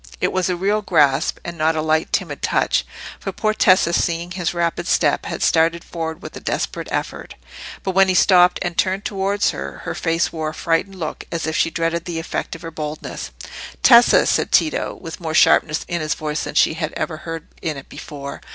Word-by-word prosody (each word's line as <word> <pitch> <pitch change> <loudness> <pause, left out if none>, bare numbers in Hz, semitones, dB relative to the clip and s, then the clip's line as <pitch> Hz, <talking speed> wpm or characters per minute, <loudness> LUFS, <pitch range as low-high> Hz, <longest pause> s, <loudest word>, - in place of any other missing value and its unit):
It - - +1
was 185 0 0
a 180 - 0
real 200 +4 0
grasp, 145 -8 +2
and 170 -1 -6
not 160 +1 +2
a 155 - 0
light, 155 0 +1
timid - - -2
touch; - - +1 0.3
for - - -4
poor 215 -1 0
Tessa, 185 -4 +4
seeing 170 0 0
his 180 -2 -2
rapid 170 -1 -1
step, - - +2
had - - -3
started 165 +1 +2
forward 160 -1 -5
with - - -8
a - - -6
desperate - - -3
effort. - - -4 0.5
But 190 - -1
when 195 +1 +4
he 185 - +1
stopped 180 -1 +5
and 175 -1 -3
turned 190 +3 0
towards 200 0 0
her, 70 +1 -7
her - - -3
face 165 +1 0
wore 160 -1 -2
a - - -8
frightened 170 +4 -1
look, 160 -4 -5
as 165 -1 -2
if 160 0 -2
she - - +2
dreaded 165 +1 -2
the 175 -2 -4
effect 165 - -4
of 165 - -12
her 165 - -6
boldness. 155 -1 -6 0.5
"Tessa!" 240 -1 +7
said - - +1
Tito, 310 - +1
with 165 - -8
more 160 -2 -4
sharpness 155 0 +4
in 170 -1 -2
his 155 0 -1
voice 150 0 -3
than - - -7
she - - +4
had 160 -1 -4
ever 155 - -3
heard 165 0 -7 0.2
in 155 -3 -3
it 135 - -10
before. 140 -2 -8
165 Hz, 210 wpm, -20 LUFS, 160-180 Hz, 0.5 s, Tessa